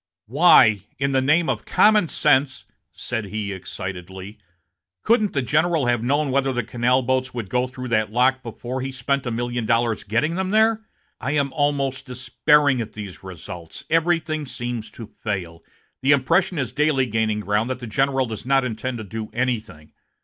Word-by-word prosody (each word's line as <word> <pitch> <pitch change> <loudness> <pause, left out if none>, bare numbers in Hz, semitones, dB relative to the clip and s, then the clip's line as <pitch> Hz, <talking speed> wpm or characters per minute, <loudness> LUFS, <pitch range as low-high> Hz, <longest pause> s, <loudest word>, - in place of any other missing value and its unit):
"Why, 115 - +5 0.2
in 140 +1 0
the 135 -1 +2
name 155 +5 +3
of 120 -6 -1
common 210 -4 +4
sense," 135 -4 +1 0.3
said 115 -4 -4
he, 100 0 -4
excitedly, 95 +2 -8 0.6
"couldn't 215 -3 +2
the 140 - 0
general 155 +2 +1
have 120 -2 +1
known 140 +3 0
whether 135 -2 0
canal 120 +3 +1
boats 130 0 -1
would 115 -6 -5
go 125 0 +1
through 130 0 -7
that 110 -2 +1
lock 130 +3 +2
before 125 +2 -6
he 135 +1 -4
spent 135 0 -2
a - - 0
million 120 0 -3
dollars 115 0 +1
getting 120 +10 0
them 190 +1 -2
there? 220 +1 +3 0.4
I 140 +3 -2
am 140 -2 0
almost 140 -2 -1
despairing 130 +1 +2
at 110 - -7
these 100 -4 -8
results. 85 -2 -9
Everything 160 -2 +1
seems 120 -3 -5
to 110 0 -11
fail. 90 -6 -4 0.4
The 140 +2 +4
impression 165 +7 +2
is 130 -4 -2
daily 145 -2 +2
gaining 110 -2 -1
ground 105 +3 0
that 130 - -2
the 125 - -8
general 135 +4 +1
does 110 -3 -7
not 135 +1 +2
intend 125 +2 -4
to 110 - -6
do 110 +2 -6
anything. 110 -11 -3
125 Hz, 170 wpm, -22 LUFS, 110-140 Hz, 0.6 s, Why